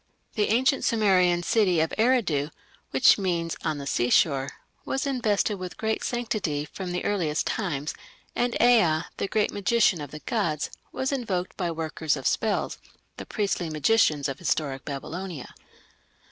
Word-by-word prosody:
The 210 -3 +1
ancient 260 +5 +2
Sumerian 185 -6 +3
city 185 -4 +2
of 160 0 0
Eridu, 215 - +2 0.4
which 135 +9 +5
means 170 -4 -1
"on 155 -2 -1
the 140 - -6
seashore", 135 +2 +2 0.3
was 270 +1 -2
invested 215 -6 0
with 180 -1 -7
great 220 0 -1
sanctity 210 -11 -2
from 185 +2 -6
the 180 - -3
earliest 165 -7 0
times, 155 -8 -2 0.4
and 245 0 0
Ea, 185 -10 +4
the - - -1
"great 215 -1 +1
magician 205 -4 +2
of 145 - -6
the 150 - -8
gods", 170 -10 -1 0.2
was 265 +1 -2
invoked 200 -9 -2
by 180 -3 -2
workers 160 -2 -1
of 135 - -8
spells, 220 -2 0 0.4
the - - -8
priestly 195 -5 -1
magicians 155 -2 +2
of 135 0 -5
historic 140 -6 -1
Babylonia. 160 +2 -6
180 Hz, 145 wpm, -26 LUFS, 155-220 Hz, 0.4 s, which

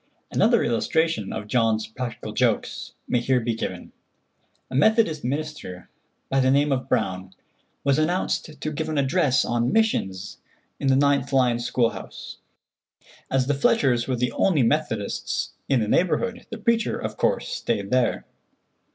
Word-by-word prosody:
Another - - +3
illustration 120 -1 0
of 105 - -5
John's 110 -1 +1
practical 115 +1 -6
jokes - - -1
may 125 - +1
here 125 +1 +2
be 115 0 -1
given. 115 - -5 0.8
A - - -4
Methodist 165 - +3
minister, 135 -9 -5 0.4
by 135 - +1
the 130 0 +3
name 140 +2 +3
of 130 -1 -1
Brown, 95 0 -1 0.5
was 140 +1 +2
announced 155 -1 -1
to 155 - -3
give 155 +1 -3
an 155 - -2
address 140 0 +2
on 120 0 0
"Missions" 100 - 0 0.4
in 140 - -1
the 135 - +4
9th 140 -1 +2
line 125 -3 +3
school 120 -1 +1
house. - - -9 0.9
As 135 -1 +1
the 145 - +1
Fletchers 130 -3 +2
were 130 - 0
the 125 0 0
only 155 0 +2
Methodists 115 -5 -1 0.2
in 135 -4 +3
the 105 - -1
neighborhood, 230 - 0
the 225 - -6
preacher, 230 0 +1
of - - -5
course, - - 0
stayed 100 -1 -2
there. 125 -1 +1
130 Hz, 150 wpm, -24 LUFS, 115-155 Hz, 0.9 s, the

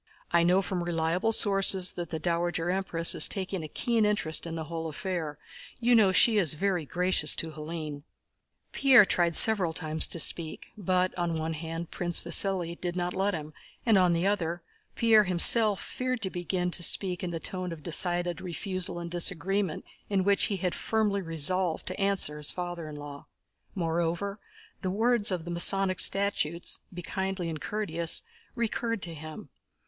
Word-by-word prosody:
"I 170 - +3
know 180 +3 +2
from 180 -2 -3
reliable 170 +5 -1
sources 195 -3 +5
that 175 -2 -7
the 160 - -4
Dowager 170 +1 -2
Empress 180 -3 +4
is - - +6
taking 190 -3 -4
a - - -6
keen 230 +8 -1
interest 205 -6 -1
in 165 - -6
the 160 - -5
whole 165 0 -6
affair. 160 -3 -5 0.4
You 245 0 +2
know 215 -5 +4
she 215 +3 +4
is 160 -6 +1
very 180 -3 -2
gracious 180 -3 +1
to 160 - -3
Hélène." 155 -1 -7 0.7
Pierre 265 -6 +5
tried 170 -3 0
several 195 -7 +6
times 160 -1 +2
to 170 - -2
speak, 160 0 +1
but, 185 -2 -1
on 170 -1 -2
one 160 0 -3
hand, 165 +1 -7
Prince 175 -1 +1
Vasíli 175 0 +2
did 175 -1 -4
not 180 0 -3
let 195 0 -1
him 155 -1 -8 0.3
and, 225 -3 +3
on 180 -2 +3
the 170 +2 -1
other, 175 -4 -2 0.3
Pierre 220 -2 +4
himself 200 +3 +6
feared 255 -2 -4
to 190 - -3
begin 180 0 -3
to 175 - -1
speak 180 +1 0
in 180 - -3
the 165 -1 -5
tone 185 +1 -4
of 160 -3 -9
decided 175 0 0
refusal 185 0 -4
and 170 0 -7
disagreement 180 +1 -1 0.2
in 195 -2 0
which 200 +1 +2
he 200 - -2
had 180 -1 -2
firmly 210 -3 -1
resolved 165 +1 -1
to 185 - -6
answer 195 -7 -1
his 150 -1 -4
father 175 -3 -6
in 150 - -9
law. 145 -1 -10 0.5
Moreover, 170 +3 -3 0.4
the 185 - -3
words 225 +2 +1
of 180 -4 -3
the 175 - -6
Masonic 185 +2 +3
statutes, 190 -4 0
"be 175 -1 -9
kindly 190 -1 -4
and 155 -2 -7
courteous," 170 -6 -3 0.3
recurred 230 -2 -3
to 170 - -5
him. 155 0 -10
180 Hz, 175 wpm, -27 LUFS, 165-195 Hz, 0.7 s, is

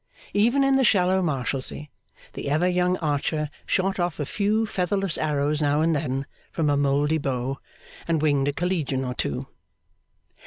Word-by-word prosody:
Even 240 +7 +3
in 270 0 +4
the 265 - +3
shallow 190 -4 +3
Marshalsea, 140 -1 -1 0.4
the - - -4
ever 155 +5 +2
young 180 0 +2
Archer 150 -1 -1 0.2
shot 195 0 0
off 175 -3 -1
a 145 - -1
few 210 +7 +1
featherless 195 -2 -1
arrows 150 0 0
now 145 +1 +2
and 165 0 +2
then 135 -2 -2 0.3
from 155 -3 +1
a - - +3
mouldy 145 +2 +2
bow, 135 -1 -2 0.5
and 165 -2 +1
winged 145 -2 +2
a 145 - +1
Collegian 150 -7 -1
or 125 - -3
two. 70 - -3
155 Hz, 160 wpm, -25 LUFS, 140-185 Hz, 0.5 s, in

